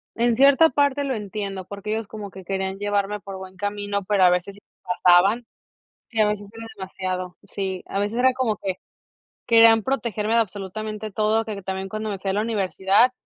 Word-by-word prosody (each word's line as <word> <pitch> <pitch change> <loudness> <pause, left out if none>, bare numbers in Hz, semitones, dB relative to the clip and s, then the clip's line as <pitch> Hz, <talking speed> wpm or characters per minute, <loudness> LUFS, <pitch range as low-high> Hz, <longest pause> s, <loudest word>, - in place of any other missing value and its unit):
en 235 0 +2
cierta 280 +4 +6
parte 285 +1 +1
lo 270 -2 -1
entiendo, 200 -2 -5
porque 200 +2 -6
ellos 220 -1 -2
como 205 -2 -8
que 190 -1 -11
querían 190 0 -2
llevarme 205 0 -1
por 195 -1 -8
buen 190 0 -10
camino, 205 0 -2
pero 200 -1 +3
a 180 - +8
veces 180 +2 0
sí - - -16
se - - -84
pasaban 185 +5 +4 0.6
sí, 225 - -3
a 210 - +4
veces 205 -1 -3
era 225 0 -8
demasiado 185 -1 -4
sí, 190 -2 -3
a 195 - -2
veces 205 +3 -1
era 260 +1 +4
como 250 -5 0
que 190 -2 -3 0.7
querían 225 -1 +7
protegerme 225 -4 -1
de - - +5
absolutamente 215 +1 -4
todo, 215 +2 +1
que 210 -2 -5
también 190 0 -4
cuando 215 +1 -4
me 200 -2 -4
fui 195 0 -2
a - - -2
la 205 - +1
universidad, 205 +1 +2
205 Hz, 200 wpm, -23 LUFS, 190-225 Hz, 0.7 s, a